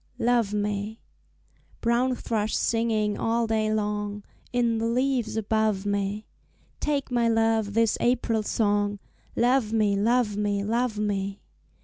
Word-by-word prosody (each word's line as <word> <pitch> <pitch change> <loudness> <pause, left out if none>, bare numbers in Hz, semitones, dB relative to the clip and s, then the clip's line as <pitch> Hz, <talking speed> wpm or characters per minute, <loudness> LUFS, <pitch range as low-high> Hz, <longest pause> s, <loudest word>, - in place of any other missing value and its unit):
Love 235 -3 +2
Me 210 +1 -2 0.8
Brown 245 +2 +1
thrush 220 -3 -2
singing 220 -2 0
all 230 +1 +1
day 220 -1 0
long 210 -1 -2 0.3
In 235 -2 +1
the 225 - 0
leaves 250 -1 0
above 215 -2 0
me, 200 +1 -1 0.5
Take 285 -3 -1
my 240 -1 +2
love 225 -2 +1
this 230 -1 +2
April 235 -2 +1
song, 205 -1 0 0.4
"Love 245 -2 +2
me, 210 -3 +2
love 220 +1 +2
me, 205 -1 0
love 230 +1 0
me!" 200 -1 -2
220 Hz, 125 wpm, -26 LUFS, 205-235 Hz, 0.8 s, Love